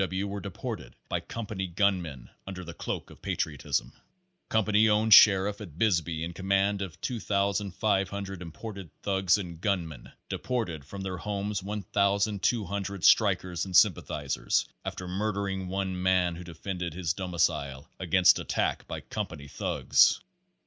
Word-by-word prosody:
W. 95 0 -1
W. 100 - -5
were 100 - -4
deported 85 -10 -6
by - - 0
company 105 -4 -5
gunmen 85 - -1 0.2
under 95 -1 -6
the 85 -1 -8
cloak - - -5
of - - -16
patriotism. 75 -4 -2
A 185 -1 -37
company 110 0 +3
owned 105 +1 +4
sheriff 100 0 +7
at 85 -7 -10
Bisbee 85 -6 +1
in 85 +1 -4
command 100 +2 +1
of 85 -6 -6
2,500 100 -2 -1
imported 95 +2 -8
thugs 95 -1 +3
and 85 -4 -7
gunmen 85 - -2 0.2
deported 95 - -3
from 100 +7 -8
their 95 -1 -4
homes 100 +2 -3
1,200 100 0 0
strikers 90 -5 +4
and 95 -2 +2
sympathizers, 75 -8 +2 0.2
after 90 - -5
murder 100 +2 -1
ing 95 -1 -3
one 95 -1 -2
man 90 -2 +2
who 90 - -8
defended 85 0 -5
his 85 -3 -1
domicile 80 -7 -1
against - - +5
attack - - -1
by - - -5
company 70 0 -5
thugs. - - +3
95 Hz, 140 wpm, -28 LUFS, 85-100 Hz, 0.2 s, sheriff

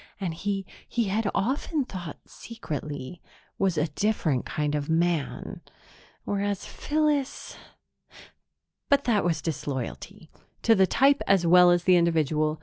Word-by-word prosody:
And 185 -5 -2
he, 195 +3 -3 0.2
he 230 -4 0
had 210 +1 0
often 270 - 0
thought 175 - -7
secretly, 155 - -7 0.4
was 190 -4 +1
a 150 +2 +1
different 155 - 0
kind 150 -1 -2
of 145 0 -2
man. 165 -2 -1 0.6
Whereas 200 -1 -2
Phyllis.... 295 -2 -1 1.3
But 280 0 +4
that 220 -5 +2
was 170 -2 -1
disloyalty 140 -5 -5 0.3
to 230 - +5
the 190 -3 +4
type 275 +8 +3
as 195 -3 +3
well 180 +1 +7
as 175 0 +3
the 180 -1 +5
individual. 155 -2 +1
180 Hz, 130 wpm, -26 LUFS, 155-215 Hz, 1.3 s, well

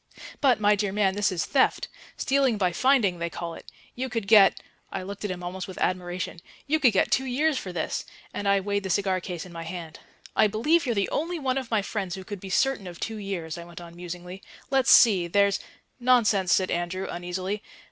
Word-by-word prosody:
"But, 260 -5 +4
my 210 0 +4
dear 205 -1 -1
man, 195 -1 +2
this 205 +1 +1
is 175 -3 -1
theft. 265 -2 +2 0.3
Stealing 265 -4 +2
by 185 -3 +1
finding, 210 -4 +2
they 170 0 -2
call 170 0 -5
it. - - -12 0.2
You 260 +1 -4
could 230 -4 -3
get" 205 -2 +6 0.3
I - - -4
looked 200 +2 -7
at 205 - -2
him 180 -1 -5
almost 180 +1 -5
with 190 - -9
admiration 180 -1 -2 0.3
"you 315 +2 +1
could 255 -6 +5
get 195 - +1
two 265 - +2
years 275 +3 +1
for 185 - -6
this"; 170 -3 -2 0.3
and 205 - -3
I 200 0 +3
weighed 200 +1 -1
the 190 - -5
cigar 185 0 +1
case 175 -1 -6
in 180 - -12
my 165 - -6
hand. 165 -2 -7 0.4
"I 215 - +5
believe 275 +10 +2
you're 235 - 0
the 200 -1 0
only 340 +4 -1
one 270 -3 0
of 255 -3 -8
my 220 -3 +1
friends 195 -4 -3
who 190 - -8
could 205 +1 -7
be 190 - -8
certain 200 +2 +1
of 175 -1 -9
two 225 -1 -4
years," 180 -5 -5
I - - -7
went 170 0 -11
on 170 -1 -11
musingly. 180 +2 -8 0.3
"Let's 265 -2 +3
see, 195 -7 +6
there's 200 +2 +3 0.3
" - - -45
"Nonsense," 210 -7 +4
said 185 -1 +3
Andrew 175 +2 -2
uneasily. 185 +4 -4
195 Hz, 225 wpm, -26 LUFS, 180-230 Hz, 0.4 s, get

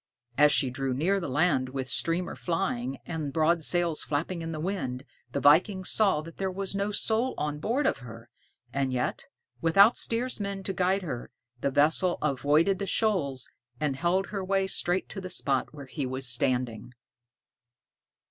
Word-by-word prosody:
As 150 +2 +5
she 135 -4 +2
drew 130 0 -2
near 185 +9 +1
the 170 - -4
land 140 -2 +2
with 130 -1 -4
streamer 170 +5 -1
flying 135 -8 -2
and 155 -4 -4
broad 160 +3 +2
sails 170 0 +1
flapping 165 +4 -2
in 165 0 -4
the 155 - -4
wind, 140 -8 -3 0.3
the - - -1
viking 185 +6 +4
saw 195 -8 +3
that 165 +1 -12
there 190 -1 -1
was 195 +1 -3
no 200 +1 -1
soul 225 +4 0
on 150 0 -2
board 245 - 0
of - - +1
her; 115 -1 -11 0.5
and 135 -1 0
yet, 125 -1 -2 0.3
without 195 +8 +5
steersman 210 -5 -1
to 195 - -3
guide 185 +2 +1
her, 125 -8 -5 0.3
the 140 - 0
vessel 160 +6 +3
avoided 150 +6 +2
the 200 - -3
shoals 160 - 0 0.3
and 150 -3 0
held 175 +6 +1
her 200 -2 -3
way 195 0 +1
straight 185 -1 +1
to 195 - -6
the 185 - -6
spot 135 -7 0
where 145 -2 -10
he 135 0 -4
was 130 +1 -3
standing. 125 -1 0
165 Hz, 170 wpm, -28 LUFS, 135-190 Hz, 0.5 s, As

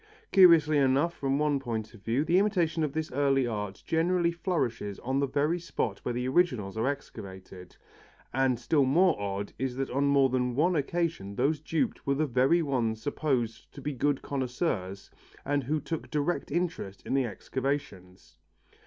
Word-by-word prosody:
Curiously 165 -5 +6
enough 140 +5 +2
from 135 -3 -1
one 150 -1 +1
point 115 -4 -4
of 115 - -15
view, 120 +8 0
the 170 +3 +4
imitation 175 -6 +1
of 150 - -1
this 160 0 -3
early 135 -1 +2
art 105 -4 -4
generally 170 +1 +2
flourishes 135 - -2
on 130 +2 -1
the 140 - +1
very 150 +6 0
spot 110 - -3
where 125 - -3
the 125 +1 -1
originals 125 - +1
are 110 +3 0
excavated, 95 -9 -7 0.6
and 130 -2 +2
still 140 +3 +2
more 170 +7 +4
odd 100 0 -3
is 130 -1 -2
it - - -11
that 135 0 -2
on 140 +3 +1
more 140 -1 +4
than 125 -1 0
one 170 +6 +2
occasion 155 - -2
those 150 +6 +1
duped 165 - -2
were 140 - +2
the 155 +3 +1
very 135 +6 +3
ones 120 -6 -1
supposed 125 -4 -2
to - - -10
be 145 +1 -3
good 140 +2 0
connoisseurs 125 - -3 0.3
and 140 -2 0
who 155 +4 0
took 165 +1 -5
direct 150 +3 -1
interest 170 - -3
in - - -3
the 135 -1 +2
excavations. 105 - -5
135 Hz, 175 wpm, -29 LUFS, 120-155 Hz, 0.6 s, Curiously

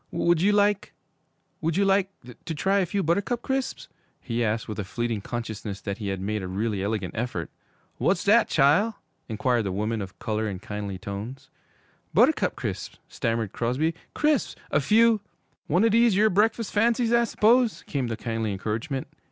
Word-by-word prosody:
'Would 170 -1 +2
you 200 +3 +4
like 205 -1 +2 0.7
would 165 +1 0
you 200 - +3
like 195 0 +3 0.4
to 160 - -3
try 195 +6 +2
a 185 - +1
few 200 +3 -1
Buttercup 200 +9 0
Crisps?' 265 -1 -2 0.3
he 120 0 -2
asked, 110 0 -1
with 110 -1 -5
a - - -1
fleeting 115 +2 -3
consciousness 110 -3 -5
that 100 +1 -4
he 105 - -4
had 95 -1 -2
made 105 +2 -2
a 95 - -4
really 100 +2 -2
elegant 100 -3 -2
effort. 110 -8 -3 0.5
'W'at's - - +2
dat, - - +5
chile?' 190 +11 +3 0.3
inquired 120 +2 +1
the 100 -3 -2
woman 105 +3 -1
of 95 0 -8
color 110 -1 -2
in 95 - -4
kindly 100 -1 -5
tones. 110 +8 -7 0.6
'Buttercup - - +4
Crisps!' - - -5
stammered 115 -3 -2
Crosby. 130 +8 0 0.2
'Crisps! 300 -4 +1 0.2
A - - +3
few 220 +7 +4 0.2
' - - -44
'One 180 +8 +3
o' - - +5
dese 230 -1 +4
yere 215 +2 +4
breakfus' 220 +3 +1
fancies, 230 +2 +2
I 235 0 +4
s'pose?' 230 +1 +3
came 135 -5 -2
the 115 -1 -3
kindly 115 -2 -2
encouragement. 110 +7 -3
125 Hz, 175 wpm, -26 LUFS, -, 0.7 s, dat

